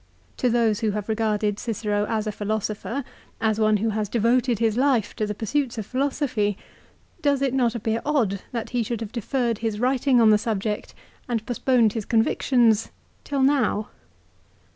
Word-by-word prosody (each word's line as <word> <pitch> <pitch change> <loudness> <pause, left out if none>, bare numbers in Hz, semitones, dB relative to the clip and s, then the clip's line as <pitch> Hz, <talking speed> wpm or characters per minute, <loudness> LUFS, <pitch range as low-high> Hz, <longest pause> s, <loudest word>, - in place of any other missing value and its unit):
To 250 - +1
those 230 -3 +2
who 220 -2 0
have 205 - -4
regarded 215 -2 0
Cicero 210 -2 -1
as 220 -1 -1
a 215 - -1
philosopher, 215 +4 -3 0.4
as 220 -1 +1
one 215 -1 +3
who 220 +3 0
has 215 -1 -2
devoted 235 +2 +2
his 225 -1 +1
life 255 -4 +1
to 215 -2 -1
the 210 - -3
pursuits 240 +3 -1
of 215 - -3
philosophy, 255 -5 -1 0.6
does 285 -2 +2
it 265 -2 +1
not 245 -3 +1
appear 225 0 -1
odd 230 -10 0
that 230 -3 -4
he 245 -1 0
should 230 0 -3
have 220 -2 -5
deferred 235 -1 -1
his 220 -2 -2
writing 255 +1 +2
on 225 -2 +6
the 210 - +5
sub 215 -3 -2
ject 210 0 -4 0.3
and 225 -2 -1
postponed 245 -3 +2
his 220 -3 -3
convictions 225 -1 +2 0.3
till 280 -2 -1
now 260 -6 +2
225 Hz, 175 wpm, -24 LUFS, 215-250 Hz, 0.6 s, on